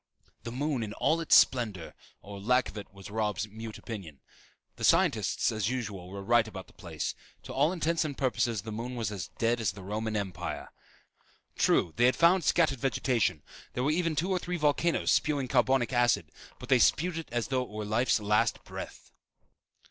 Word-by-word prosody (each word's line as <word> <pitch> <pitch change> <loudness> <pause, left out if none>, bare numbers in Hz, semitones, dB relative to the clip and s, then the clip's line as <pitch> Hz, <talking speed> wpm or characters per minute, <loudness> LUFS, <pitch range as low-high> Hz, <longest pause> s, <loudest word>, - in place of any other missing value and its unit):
the 115 - -6
moon 140 +1 -1
in 105 -2 -4
all 165 +8 +1
its 165 - +4
splendor, 110 -10 +3 0.3
or 100 0 -9
lack 125 +4 +2
of - - -12
it 100 -2 -8
was 95 +1 -11
Robb's 105 -1 -1
mute 110 +1 -8
opinion. 95 -11 -8 0.6
The - - -7
scientists, - - +3
as 110 -1 -1
usual, 105 -8 -4
were 100 +1 -7
right 115 +1 +3
about 95 -3 -8
the - - -21
place. 80 -5 -4 0.3
To - - -8
all 145 +5 +3
intents 165 -2 0
and 145 -3 -4
purposes 120 -5 0
the 110 - -6
moon 120 +4 -5
was 115 -4 -2
as 95 -8 -5
dead 115 +1 +1
as 110 - 0
The 95 - -10
Roman 110 +3 -3
Empire. 90 -4 -4 0.9
True 85 - +2
they 120 - +5
had 130 - +4
found 175 +2 +4
scattered 155 -7 +2
vegetation; 120 - 0 0.3
there 125 - -2
were 145 - +2
even 165 0 0
two 175 +6 0
or 185 - +1
three 180 0 -3
volcanoes 155 +2 +1
spewing 145 -4 +1
carbonic 130 -1 +2
acid, 120 -3 +2 0.3
but - - -11
they 130 -2 +5
spewed 165 +7 +2
it 165 - -8
as 120 -2 -2
though 130 -1 +1
it 125 - -6
were 105 0 -5
life's 110 +4 +2
last 105 0 +1
breath. - - -9
120 Hz, 195 wpm, -29 LUFS, 105-135 Hz, 0.9 s, they